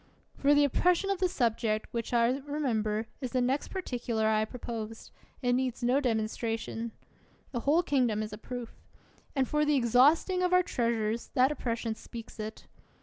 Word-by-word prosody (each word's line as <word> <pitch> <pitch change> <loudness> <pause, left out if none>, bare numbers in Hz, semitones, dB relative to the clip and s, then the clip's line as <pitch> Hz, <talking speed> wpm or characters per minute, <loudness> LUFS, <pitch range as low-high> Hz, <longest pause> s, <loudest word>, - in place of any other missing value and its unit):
For 285 +1 +4
the 290 - +5
oppression 360 +7 +2
of 390 - -1
the 370 -1 +2
subject, 225 -7 0
which, 230 -1 -3
as 240 +2 +3
I - - -8
remember, 220 -7 0 0.2
is 255 -2 -4
the 255 - +2
next 255 +3 0
particular 245 - -2
I 215 0 +3
proposed, 225 -2 -7 0.3
it 245 0 +3
needs 255 -1 -1
no 250 +3 +3
demonstration. 225 -1 -2 0.6
The 240 - -2
whole 300 +8 +3
kingdom 245 -8 +1
is 215 0 -6
a 210 - -7
proof. 245 -1 -6 0.6
And 265 -2 +2
for 300 0 +1
the 300 0 +3
exhausting 275 - +4
of 360 0 +2
our 365 0 +6
treasures, 230 -5 -1
that 260 +2 +5
oppression 230 -5 -2
speaks 230 0 -10
it. 215 0 -6
245 Hz, 170 wpm, -30 LUFS, 225-285 Hz, 0.6 s, our